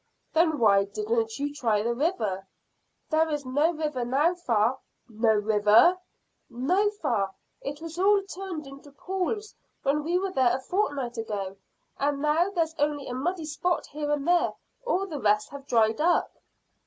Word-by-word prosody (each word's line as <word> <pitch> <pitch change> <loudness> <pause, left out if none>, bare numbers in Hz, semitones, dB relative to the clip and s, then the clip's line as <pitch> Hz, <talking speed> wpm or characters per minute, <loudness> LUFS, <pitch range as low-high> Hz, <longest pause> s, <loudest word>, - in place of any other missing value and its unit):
"Then 320 -1 +3
why 200 -5 +4
didn't 225 +2 -2
you 285 +1 -2
try 225 -7 +1
the 235 +1 0
river?" 220 - -1 0.6
"There 320 +1 +3
is 295 -2 -3
no 290 +6 +2
river 300 -6 -2
now, 280 +8 +2
fa." 245 -8 +1 0.3
"No 220 -1 +2
river?" 210 - +5 0.5
"No, 350 - +1
fa; 290 - -1 0.3
it 290 +2 -6
was 330 +1 -7
all 400 +1 +4
turned 380 -5 -6
into 275 +1 -12
pools 385 +6 -3 0.3
when 290 +2 +1
we 340 +3 +1
were 385 +1 -1
there 260 -7 +3
a - - -9
fortnight 270 - -2
ago, 200 -4 -4 0.4
and 280 0 0
now 305 +5 +2
there's 330 -5 -1
only 290 -1 0
a 245 - -5
muddy 325 +6 -2
spot 330 +4 -1
here 295 0 -5
and 295 0 -1
there; 350 0 +3 0.3
all 390 -5 +1
the 315 -7 -5
rest 210 0 +2
have 280 -1 -10
dried 225 +2 +2
up." 345 +2 +2
290 Hz, 165 wpm, -27 LUFS, 230-340 Hz, 0.6 s, river